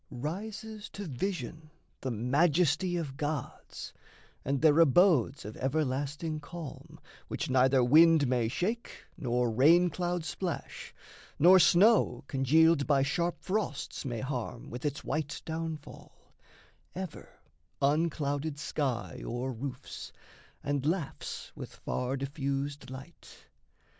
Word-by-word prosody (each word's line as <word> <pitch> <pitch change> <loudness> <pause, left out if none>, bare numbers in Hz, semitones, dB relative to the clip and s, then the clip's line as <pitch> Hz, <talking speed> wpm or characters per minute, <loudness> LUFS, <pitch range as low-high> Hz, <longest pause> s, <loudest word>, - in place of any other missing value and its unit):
Rises 205 - -6
to 205 - -6
vision 160 +1 -4 0.3
the 130 - -3
majesty 155 - +2
of 140 -5 -4
gods, 150 -3 -5 0.5
And 140 +1 0
their 155 +1 +5
abodes 160 - +4
of 105 - -7
everlasting 145 +3 -1
calm 155 -1 -9 0.3
Which 160 - -3
neither 130 0 +4
wind 160 +3 +6
may 125 -3 +1
shake 215 - -3
nor 120 -2 0
rain 165 +9 +5
cloud 175 0 -2
splash, 180 0 -5 0.5
Nor 185 +4 +8
snow, 175 - +5
congealed 145 +3 +3
by 140 -2 +4
sharp 170 +5 -1
frosts, 190 -7 -2
may 120 -5 -3
harm 125 -3 -4
With 120 +4 -6
its 145 -1 -2
white 150 0 -2
downfall: 160 -2 -7 0.6
ever, 185 -4 -7 0.4
unclouded 145 0 0
sky 140 -4 -3
O'er 125 +2 -3
roofs, 125 +3 -7 0.5
and 145 -2 -1
laughs 160 0 -3
with - - -8
far 125 +2 -2
diffused 140 0 -3
light. 135 +6 -12
145 Hz, 115 wpm, -30 LUFS, 135-170 Hz, 0.6 s, Nor